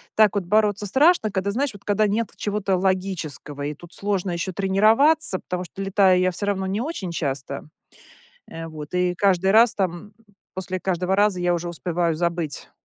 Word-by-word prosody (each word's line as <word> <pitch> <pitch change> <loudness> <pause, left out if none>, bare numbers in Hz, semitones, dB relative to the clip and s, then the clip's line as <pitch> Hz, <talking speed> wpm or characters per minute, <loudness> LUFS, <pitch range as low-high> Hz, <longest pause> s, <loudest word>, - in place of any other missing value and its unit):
так 215 -2 +4
вот 200 -3 -1
бороться 210 +1 +2
страшно, 265 - +3
когда, 195 +1 -1
знаешь, 260 +3 -1
вот, 200 -1 -14
когда 210 +1 +2
нет 220 +2 -1
чего-то 200 -2 -1
логического 180 -7 -2
и 145 +1 -3
тут 175 +4 -15
сложно 200 -2 -2
еще 175 +2 -3
тренироваться, 215 - +3
потому 180 0 -4
что 195 - -9
летаю 195 -1 +3
я 185 0 +2
всё 190 +3 -4
равно 195 -1 -1
не 200 +4 -2
очень 245 - -4
часто. 140 -4 -4 0.8
Э, 165 0 -7
вот 155 0 -9
и 180 0 +1
каждый 190 0 +2
раз 230 +2 +5
там 190 0 -3 0.4
после 185 0 -4
каждого 185 +1 -1
раза 205 -3 +2
я 175 0 +2
уже 175 0 -3
успеваю 170 0 -1
забыть. 170 -2 -3
190 Hz, 180 wpm, -23 LUFS, 175-205 Hz, 0.8 s, раз